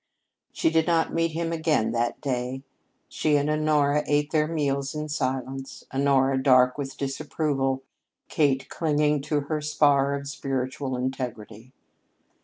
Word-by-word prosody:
She 160 - +1
did 160 0 +2
not 165 -1 +2
meet 165 -1 0
him 165 +1 -2
again 160 -8 +1
that 120 0 -1
day. 130 -1 -3 0.4
She 150 -1 0
and 145 0 0
Honora 150 -1 +2
ate 145 +1 +1
their 155 -1 +2
meals 140 -3 -1
in 150 0 -4
silence, 135 -1 -3
Honora 135 -1 +2
dark 125 -1 +5
with 140 -2 -5
disapproval, 135 -1 -1 0.4
Kate 135 -3 +1
clinging 150 -2 +1
to 150 0 -1
her 150 +2 -3
spar 145 -2 +3
of 140 0 -6
spiritual 130 -1 -3
integrity. 125 -3 -5
140 Hz, 135 wpm, -26 LUFS, 130-150 Hz, 0.4 s, dark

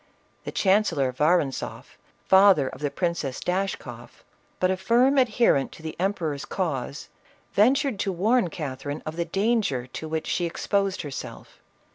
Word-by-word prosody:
The - - -4
chancellor 190 -10 +2
Vorontzoflj 150 0 0 0.4
father 190 -7 +6
of 130 - -8
the 145 - 0
Princess 170 -6 -2
Dash 190 +2 -1
koff, - - -12 0.4
but 185 0 +2
a - - +1
firm 245 +8 +3
adherent 230 - +2
to 160 - -14
the 160 - -5
emperor's 170 -7 -1
cause, 145 -6 -3 0.4
ven 225 +7 +5
tured 275 -7 -1
to 195 - 0
warn 210 +3 +2
Catherine 145 -2 -5
of 155 - -5
the 170 0 -1
danger 195 - 0
to 145 +5 -7
which 160 0 -2
she 175 - -1
exposed 195 +2 -1
herself. 145 -3 -8
180 Hz, 150 wpm, -25 LUFS, 145-200 Hz, 0.4 s, father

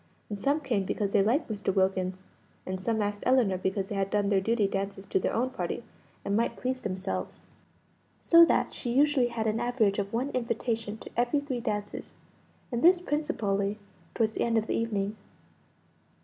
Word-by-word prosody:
And 205 - -4
some 285 +7 +1
came 240 -8 0
because 200 +1 -2
they 200 - +4
liked 240 +10 +2
Mr. 205 -3 -2
Wilkins, 190 -1 0 0.4
and 185 0 -4
some 220 +1 0
asked 205 0 -3
Ellinor 235 -8 +3
because 190 +1 -1
they - - -3
had 195 -1 0
done 205 -1 +1
their 195 -2 +3
duty 225 +1 +1
dances 195 0 -3
to 190 - +1
their - - 0
own 255 +3 0
party, 260 - -3 0.4
and 200 - 0
might 230 +2 0
please 255 0 -2
themselves. 185 -1 -4 0.8
So 335 0 +7
that - - +1
she 240 - -4
usually 280 -2 +4
had 235 -2 -3
an 220 +1 +1
average 230 -4 +1
of 200 0 -2
one 255 +5 -1
invitation 230 -3 -2
to - - -11
every 240 +4 +2
three 280 -4 -3
dances; 210 -3 -4 0.6
and 240 -1 -1
this 355 +2 +6
principally 210 - -1 0.4
towards 220 -1 +2
the - - -4
end 230 -1 +1
of 220 - +1
the - - -2
evening. 210 -2 -1
220 Hz, 185 wpm, -28 LUFS, 200-245 Hz, 0.8 s, So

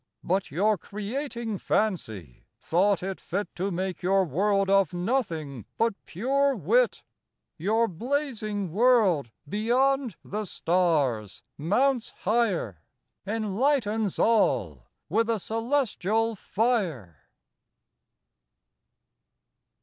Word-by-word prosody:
But 190 +2 0
your 200 +7 +1
Creating 225 - -4
Fancy, 110 - -2
thought 185 +2 +2
it 190 0 -4
fit 200 +4 -4
To 190 +3 -2
make 185 0 -3
your 190 +1 +3
World 195 +5 +1
of 195 -3 +3
Nothing, 170 - -2
but 230 0 +2
pure 275 - +1
Wit. 230 - +2 0.6
Your 220 +7 +2
Blazing 215 - -2
World, 205 - +3 0.2
beyond 245 - +1
the 210 +1 -3
Stars 155 - 0
mounts 240 - +1
higher, 195 - 0 0.5
Enlightens 220 0 0
all 95 - +2 0.2
with 225 +7 +1
a - - +3
Cœlestial 225 -1 0
Fier. 230 +4 +1
William 160 - -5
Newcastle. 85 -3 -23
205 Hz, 95 wpm, -27 LUFS, 175-230 Hz, 0.6 s, your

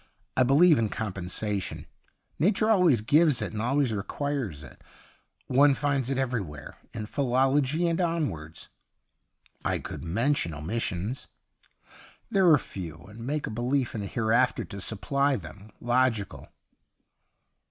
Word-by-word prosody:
I - - +3
believe 145 +5 +5
in 110 -2 +1
compensation. 100 -1 -3 0.5
Nature 210 +6 +3
always 175 - +4
gives 150 +5 +4
it - - -4
and 105 - -3
always 130 0 +1
requires 105 - -3
it. - - -14 0.6
One 140 +2 +4
finds 135 -3 0
it 135 - -1
everywhere, 110 - -3 0.2
in 110 -1 -5
philology 135 +6 +1
and 170 +2 0
onwards.' 145 - -3 0.5
' - - -51 0.3
I - - 0
could - - -7
mention 95 - 0
omissions.' 95 - -3 0.5
' - - -24
They 195 - +2
are 170 -5 +7
few, 80 - -7
and 105 +4 -13
make 150 +1 -1
a - - -5
belief 125 +3 -1
in 110 - -3
a 100 - -4
hereafter 115 +4 +1
to 100 -1 -7
supply 140 +8 +1
them 100 +1 -9
logical.' 120 -4 0
125 Hz, 135 wpm, -27 LUFS, 105-145 Hz, 0.6 s, are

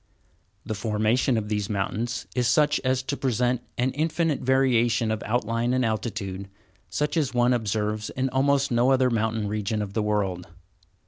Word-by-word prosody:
The 110 - -3
formation 110 +4 +1
of 105 -1 -2
these 105 0 -2
mountains 110 +4 -2
is 125 -2 +1
such 150 +5 +3
as 130 0 0
to 140 - -2
present 125 -2 0 0.2
an 125 +2 +1
infinite 160 0 0
variation 120 -3 +2
of 110 - -2
outline 115 +2 0
and 130 -1 +1
altitude, 100 -4 -3 0.4
such 150 +2 -1
as 145 -6 0
one 120 +1 +4
observes 105 -2 -1
in 130 0 -1
almost 140 +1 +2
no 120 +2 +3
other 130 -1 +3
mountain 110 -1 0
region 105 +1 -2
of 100 -2 -4
the 110 - 0
world. 100 -4 -1
120 Hz, 165 wpm, -25 LUFS, 105-130 Hz, 0.4 s, one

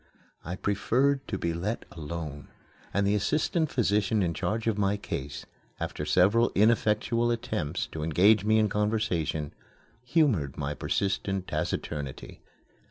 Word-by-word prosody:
I 90 +3 -4
preferred 130 +8 +1
to 95 - -2
be 85 -2 -1
let 95 +8 -3
alone, 75 -3 -6 0.4
and 100 +1 +1
the 100 - +2
assistant 155 - +1
physician 105 -4 +1
in 85 -2 0
charge 110 +8 -2
of 115 -2 +1
my 100 0 +2
case, 70 -8 -5 0.3
after - - -4
several 105 +6 +4
ineffectual 115 +2 +3
attempts 110 -9 -2
to 80 - -5
engage 95 +7 +4
me 110 +1 +3
in 110 -1 +4
conversation, 105 -8 -1 0.5
humored 120 - +1
my 70 +1 -2
persistent 95 +3 -1
taciturnity. 70 -3 -4
100 Hz, 130 wpm, -28 LUFS, 85-110 Hz, 0.5 s, several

